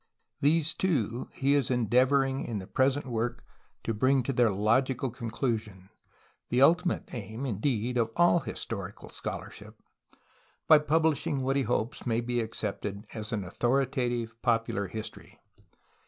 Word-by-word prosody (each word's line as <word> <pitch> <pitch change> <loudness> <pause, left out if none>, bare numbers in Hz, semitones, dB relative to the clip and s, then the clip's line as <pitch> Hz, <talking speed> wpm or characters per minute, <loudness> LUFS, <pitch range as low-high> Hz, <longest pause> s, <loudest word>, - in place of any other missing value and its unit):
These 160 +2 +3
two 125 - -1
he 140 +1 +2
is 140 -4 +2
endeavoring 130 +3 +2
in 115 - -3
the 95 - -6
pres 130 +6 +2
ent 145 - -5
work 120 -1 -3 0.4
to 115 - -1
bring 130 +4 +3
to 135 - -2
their 120 -2 +4
logical 120 +6 +1
conclusion 110 -5 -3 0.3
— - - -35
the 125 - +1
ultimate 175 +6 +3
aim, 110 +2 -5
indeed, 120 +1 -1
of 115 -1 +1
all 175 0 +5
historical 110 - -6
scholarship - - -7 0.5
— - - -36
by 155 - +8
publishing 150 -3 +1
what 135 +1 +1
he 140 - +3
hopes 120 -1 -1
may 115 -1 +1
be 120 0 -1
accepted 105 -2 -4
as 110 0 -4
an 105 -4 -1
authoritative 120 +2 0
popular 115 -4 0
history. 110 +3 -8
120 Hz, 145 wpm, -29 LUFS, 110-135 Hz, 0.5 s, by